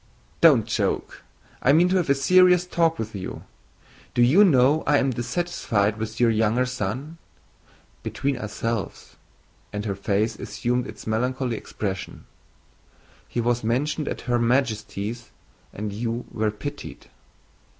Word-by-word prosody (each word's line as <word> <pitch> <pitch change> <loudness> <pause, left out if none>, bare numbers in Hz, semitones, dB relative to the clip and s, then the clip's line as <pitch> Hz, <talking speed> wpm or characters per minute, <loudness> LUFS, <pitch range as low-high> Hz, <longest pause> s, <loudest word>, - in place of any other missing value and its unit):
"Don't - - +6
joke; - - -2 0.4
I 135 - +4
mean 170 +4 +5
to 190 - +2
have 175 -5 0
a 140 - +5
serious 180 +5 +5
talk 165 -2 +1
with 110 0 -5
you. 95 -2 -6 0.7
Do 120 - +5
you 155 +12 +6
know 145 -3 +4
I 145 - +5
am 135 -1 +1
dissatisfied 120 - -1
with 110 0 -5
your 120 -2 +4
younger 110 +3 +2
son? 130 +7 -4 0.8
Between 140 0 -2
ourselves" 115 -3 -4 0.6
(and 105 +1 -4
her 100 - -1
face 105 +3 -1
assumed 125 0 -2
its - - -10
melancholy 125 +2 -1
expression), 95 -3 -5 1.0
"he - - -3
was 120 0 0
mentioned 145 +7 -1
at - - -4
Her 120 -1 0
Majesty's 115 -2 -1 0.4
and 105 0 -5
you 115 +3 -3
were 110 -1 0
pitied...." 105 -1 -7
120 Hz, 135 wpm, -24 LUFS, 110-140 Hz, 1.0 s, Don't